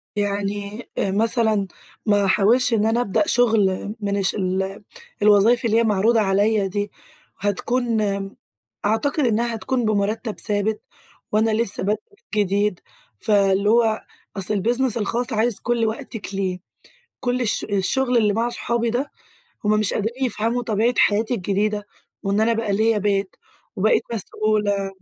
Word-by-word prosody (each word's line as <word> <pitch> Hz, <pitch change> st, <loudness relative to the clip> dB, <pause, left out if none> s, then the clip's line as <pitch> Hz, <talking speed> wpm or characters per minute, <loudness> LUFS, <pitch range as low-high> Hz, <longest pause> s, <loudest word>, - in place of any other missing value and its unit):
يعني 205 Hz, +2 st, -2 dB
أ 195 Hz, -, 0 dB
مثلًا 220 Hz, -1 st, +1 dB, 0.4 s
ما 205 Hz, -2 st, +3 dB
أحاولش 225 Hz, +6 st, +3 dB
إن 215 Hz, -1 st, +2 dB
أنا 225 Hz, +2 st, +2 dB
أبدأ 245 Hz, +7 st, 0 dB
شُغل 215 Hz, -3 st, +2 dB
من 200 Hz, -1 st, -1 dB
الش 195 Hz, -1 st, 0 dB
ال 190 Hz, +1 st, -2 dB, 0.4 s
الوظايف 210 Hz, +4 st, +4 dB
اللي 225 Hz, 0 st, +3 dB
هي 230 Hz, -, +4 dB
معروضة 220 Hz, +2 st, +3 dB
عليَّ 200 Hz, +1 st, +2 dB
دي، 205 Hz, +1 st, -3 dB, 0.5 s
هتكون، 230 Hz, +3 st, 0 dB, 0.8 s
أعتقد 275 Hz, +7 st, +1 dB
إنها 235 Hz, 0 st, +1 dB
هتكون 245 Hz, +2 st, -1 dB
بمرتّب 215 Hz, +1 st, -1 dB
ثابت 210 Hz, +1 st, -1 dB, 0.5 s
وأنا 220 Hz, +1 st, +2 dB
لسه 215 Hz, -2 st, -1 dB
بادئة 210 Hz, +2 st, 0 dB, 0.4 s
جديد، 205 Hz, -2 st, +1 dB, 0.4 s
فاللي 200 Hz, -1 st, +2 dB
هو 225 Hz, -1 st, +3 dB, 0.4 s
أصْل 195 Hz, +2 st, -1 dB
البيزنس 235 Hz, +4 st, +1 dB
الخاص، 235 Hz, +3 st, -2 dB
عايز 225 Hz, 0 st, +1 dB
كل 235 Hz, -1 st, 0 dB
وقتِك 225 Hz, -3 st, -5 dB
ليه، 185 Hz, -2 st, -2 dB, 0.6 s
كل 250 Hz, 0 st, -1 dB
الش 225 Hz, -4 st, 0 dB
الشغل 245 Hz, +6 st, 0 dB
اللي 215 Hz, -3 st, +3 dB
مع 230 Hz, +3 st, 0 dB
أصحابي 235 Hz, -1 st, -1 dB
ده، 265 Hz, +5 st, -2 dB, 0.5 s
هُم 210 Hz, -, +2 dB
مش 210 Hz, -, 0 dB
قادرين 235 Hz, +5 st, -2 dB
يفهَموا 235 Hz, +2 st, -1 dB
طبيعة 225 Hz, +2 st, +1 dB
حياتي 220 Hz, +4 st, +3 dB
الجديدة 205 Hz, +1 st, -1 dB, 0.4 s
وإن 200 Hz, +2 st, 0 dB
أنا 230 Hz, +1 st, +3 dB
بقى 225 Hz, -2 st, -1 dB
ليَّ 220 Hz, +2 st, +2 dB
بيت 200 Hz, -1 st, -1 dB, 0.4 s
وبقيت 210 Hz, +3 st, +3 dB
مسئولة 210 Hz, -2 st, -1 dB
215 Hz, 140 wpm, -22 LUFS, 200-230 Hz, 0.8 s, الوظايف